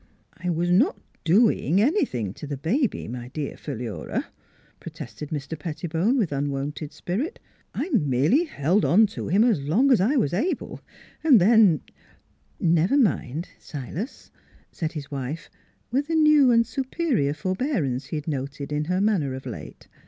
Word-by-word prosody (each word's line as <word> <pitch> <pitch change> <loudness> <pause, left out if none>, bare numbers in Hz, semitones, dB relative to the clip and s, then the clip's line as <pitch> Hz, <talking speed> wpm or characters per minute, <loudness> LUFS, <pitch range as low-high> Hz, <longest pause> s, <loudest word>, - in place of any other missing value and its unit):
" - - -31
I 180 - 0
was 175 +1 0
not 255 - +3 0.2
doing 190 - +3
anything 220 - +1
to 150 - -9
the 140 -1 -4
baby, 220 - 0
my 120 +1 -6
dear 140 +2 -5
Philura," 120 -6 -4 0.5
protested 150 -2 -8
Mr. 150 +1 -5
Pettibone, 170 - -1
with 195 - 0
un 140 +1 -1
wonted 140 +2 -4
spirit. 200 - -3 0.2
" - - -32
I 315 - -1
merely 150 - +3
held 180 - +1
on 215 +6 +5
to - - -5
him 200 +6 +4
as 230 - +2
long 210 - +2
as 235 - +5
I 240 +10 +2
was 195 - +1
able, 295 - -2 0.4
and 285 -8 +7
then 200 -4 +5 0.2
" - - -32
" - - -38
Never 170 - +3
mind, 165 - 0
Silas," 155 - -7 0.4
said 160 -1 -4
his 150 -3 -7
wife, 140 +4 -5 0.4
with 275 +4 0
the 325 - -1
new 305 -4 +6
and 230 -1 +4
superior 250 - -1
forbearance 185 - -1
he - - -5
had 150 0 -5
noted 140 0 -4
in 150 +1 -1
her 180 +3 0
manner 180 -11 +1
of 130 - -9
late. - - -9
170 Hz, 165 wpm, -25 LUFS, 145-235 Hz, 0.5 s, and